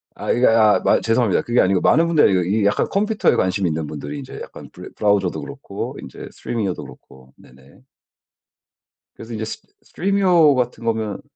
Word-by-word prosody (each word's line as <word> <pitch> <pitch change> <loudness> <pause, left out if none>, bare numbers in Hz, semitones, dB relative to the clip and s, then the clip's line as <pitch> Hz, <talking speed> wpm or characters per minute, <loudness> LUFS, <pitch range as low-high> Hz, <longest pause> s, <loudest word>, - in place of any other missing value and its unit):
아 - - -3
이게 125 +2 +2
아 110 -2 +4
마 - - +3
죄송합니다. 115 -3 +1
그게 120 +1 0
아니고 95 0 +2
많은 165 +3 +4
분들이 160 -3 +4
아니고 95 -2 +2
이 100 +4 0
약간 100 - +1
컴퓨터에 210 +2 +1
관심이 95 0 0
있는 80 -1 -3
분들이 75 - -7
이제 135 -1 -9
약간 - - -12
브래 - - -11
브라우저도 100 -3 0
그렇고 140 -8 -7
인제 - - -10
Stremio도 105 -6 -4
그렇고 65 0 -16
네네. 65 - -20 1.3
그래서 115 - -11
인제 110 0 -4 0.4
Stremio 180 -6 +2
같은 125 -2 -2
거면 110 -3 -2
110 Hz, 440 characters per minute, -20 LUFS, 95-140 Hz, 1.3 s, 아